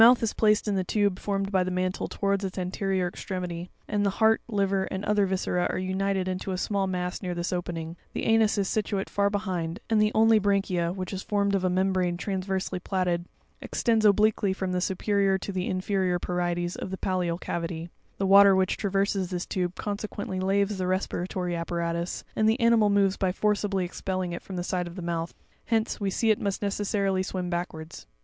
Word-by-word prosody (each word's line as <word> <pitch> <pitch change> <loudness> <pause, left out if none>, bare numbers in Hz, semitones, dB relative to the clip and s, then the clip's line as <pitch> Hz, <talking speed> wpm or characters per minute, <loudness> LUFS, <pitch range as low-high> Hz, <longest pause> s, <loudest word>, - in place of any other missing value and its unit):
91 240 +2 +9
is 225 - 0
placed 215 0 +3
in 205 - +1
the 190 -1 +1
tube 200 0 +1
formed 195 -1 -2
by 190 -2 +3
the 180 - -2
mantle 185 +1 -1
towards 200 0 -1
its 190 0 -4
anterior 185 0 -1
extremity; 180 -1 -5 0.2
and 210 -1 0
the 200 - +3
heart, 220 0 +4
liver, 195 -3 +1
and 190 +1 -4
other 205 -1 +2
viscera, 185 -1 0
are - - -2
united 190 0 -1
into 185 +1 -3
a 185 - -2
small 195 +1 0
mass 180 -1 -3
near 180 -3 -3
this 175 +1 -2
opening; 170 -2 -4 0.2
the - - -3
anus 225 -1 +3
is 200 -2 +1
situate 200 -2 -1
far 200 0 +2
be 205 - 0
hind, 180 -4 -3
and 215 -1 +4
the 215 0 +3
only 225 0 +6
branchia, 195 -4 +1
which 185 0 -5
is 190 - -3
formed 200 -1 0
of 195 -2 +1
a 185 - +2
membrane 185 -1 +1
transversely 190 -1 -2
plaited, 180 -2 -1 0.4
extends 225 -2 +1
obliquely 210 -1 +4
from 190 -1 -3
the 180 0 0
superior 195 +1 +1
to 195 - -5
the 185 -1 -2
inferior 185 -1 0
parietes 175 0 -1
of - - -5
the 190 - -4
pallial 180 -3 -1
cavity; 165 -1 -4 0.3
the 195 - 0
water 200 0 +8
which 190 -1 +1
traverses 195 -2 0
this 180 -1 -3
tube, 180 -1 -2
consequently 205 -2 -4
laves 195 +1 +1
the 185 - -1
respiratory 180 -1 -1
apparatus, 170 0 -2
and 215 0 +3
the 225 +4 +1
animal 230 -3 +4
moves 200 -1 +3
by 190 -2 +1
forcibly 200 -1 0
expelling 185 0 -3
it 170 - -5
from 190 - -8
the 175 - -2
side 180 -1 -1
of 170 - -9
the 185 - -6
mouth: 170 -1 -3 0.3
hence, 225 -1 0
we 200 -2 0
see 220 +4 +2
it 215 - 0
must 200 0 -2
necessarily 200 -1 0
swim 185 -1 -3
backwards. 165 -2 -5
190 Hz, 200 wpm, -27 LUFS, 180-200 Hz, 0.4 s, 91